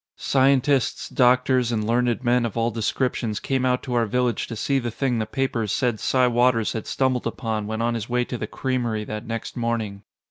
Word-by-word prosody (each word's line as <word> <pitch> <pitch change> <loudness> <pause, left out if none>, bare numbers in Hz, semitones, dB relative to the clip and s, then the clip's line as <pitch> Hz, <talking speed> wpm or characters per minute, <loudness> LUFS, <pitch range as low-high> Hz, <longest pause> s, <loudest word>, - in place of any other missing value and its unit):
Scientists, 135 -1 +2
doctors, 125 -1 +3
and 110 -2 -1
learned 120 +1 +1
men 120 0 +3
of 115 -1 -3
all 115 +1 +1
descriptions 115 0 -1
came 130 -1 0
out 125 0 +1
to 125 - -4
our 120 -2 +2
village 125 +2 0
to 115 - -6
see 135 +5 0
the 120 -2 -3
thing 120 +1 -1
the 110 - -2
papers 120 -6 -1
said 120 -5 0
Si 130 +4 +2
Waters 120 -2 +2
had 110 - -5
stumbled 130 -2 0
upon 110 -4 -3
when 110 +1 -2
on 120 0 +1
his 115 -1 -4
way 125 0 +1
to 125 - -5
the 110 - -3
creamery 120 -4 -2
that 105 +2 -6
next 115 0 -5
morning. 115 -4 -2
120 Hz, 205 wpm, -23 LUFS, 115-125 Hz, -, doctors